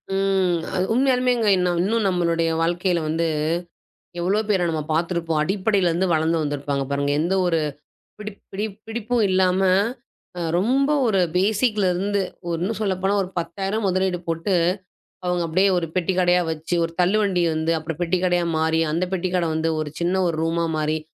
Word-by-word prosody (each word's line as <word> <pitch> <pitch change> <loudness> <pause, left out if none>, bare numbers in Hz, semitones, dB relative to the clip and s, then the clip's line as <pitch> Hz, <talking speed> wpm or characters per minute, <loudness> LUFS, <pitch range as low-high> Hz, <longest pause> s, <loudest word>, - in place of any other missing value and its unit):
ம். 190 -3 +1 0.2
அது 185 0 +1
உண்மையாலுமேங்க 250 -3 +2
இன்னும் 180 +5 +1
நம்முடைய 170 -2 +1
வாழ்க்கையில 175 +1 +1
வந்து, 165 +1 0 0.9
எவ்வளவோ 195 +5 +1
பேர 190 -4 +2
நம்ம 160 -1 -1
பார்த்திருப்போம். 165 -1 0
அடிப்படையில 190 0 +1
இருந்து 180 +3 0
வளர்ந்து 160 +1 +1
வந்திருப்பாங்க 145 -1 -2
பாருங்க, 140 0 0
எந்த 175 +4 0
ஒரு 165 -2 +2 0.6
பிடி 210 0 -6 0.2
பிடி 205 +3 -2 0.2
பிடிப்பும் 230 0 -1
இல்லாம 185 0 +2 0.8
அ - - -3 0.2
ரொம்ப 265 +10 +2
ஒரு 200 -4 +2 0.2
பேசிக்ல 210 +1 +2
இருந்து 200 +3 0 0.3
ஒரு 170 - -1
இன்னும் 205 +4 -2
சொல்லப்போனா 195 -1 0
ஒரு 185 - -5
10000 195 +5 -3
முதலீடு 185 -1 0
போட்டு 165 +4 -1 0.7
அவங்க 180 -1 0
அப்டியே 185 +5 +2
ஒரு 170 - -2
பெட்டிக்கடையா 180 0 +2
வச்சு, 160 +2 -3
ஒரு 165 - -4
தள்ளுவண்டி 190 0 +2
வந்து 160 +1 0
அப்புறம் 160 +1 -6
பெட்டிக்கடையா 175 0 +1
மாறி, 160 +1 +1
அந்த 170 +3 0
பெட்டிக்கடை 180 -2 0
வந்து 160 +1 0
ஒரு 150 -1 -4
சின்ன 180 +2 +1
ஒரு 165 - -2
ரூமா 165 +1 0
மாறி, 155 +1 0
180 Hz, 150 wpm, -22 LUFS, 165-195 Hz, 0.9 s, உண்மையாலுமேங்க